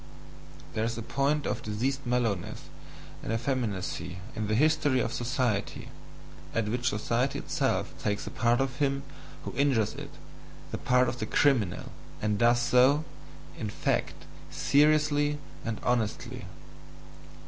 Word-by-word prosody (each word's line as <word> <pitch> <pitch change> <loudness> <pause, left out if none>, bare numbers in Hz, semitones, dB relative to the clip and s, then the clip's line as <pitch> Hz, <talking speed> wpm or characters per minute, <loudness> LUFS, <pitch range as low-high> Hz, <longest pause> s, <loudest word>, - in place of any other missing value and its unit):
There 110 - 0
is 115 0 -1
a 115 - -4
point 140 +4 +1
of - - -1
diseased 125 +6 -2
mellowness 115 -7 0 0.6
and - - -4
effeminacy 110 -7 -2 0.2
in 105 -1 -2
the 110 - +1
history 150 -1 +3
of 115 0 -1
society, 120 -4 -1 0.7
at 115 -2 +1
which 120 +3 +1
society 120 +5 0
itself - - -1
takes 105 0 -1
the - - -6
part 120 +1 +2
of 135 0 -2
him 140 -1 +1 0.4
who - - -4
injures 135 -7 +2
it, - - -7 0.6
the - - -3
part 125 0 +3
of 120 +1 -3
the - - -2
CRIMINAL, 120 -11 +2 0.3
and 105 -1 0
does 120 0 +5
so, 130 +5 +4 0.6
in 105 - -2
fact, - - -1 0.2
seriously 150 0 +3 0.3
and 115 -2 -3
honestly. 120 -4 -1
120 Hz, 135 wpm, -29 LUFS, 110-140 Hz, 0.7 s, does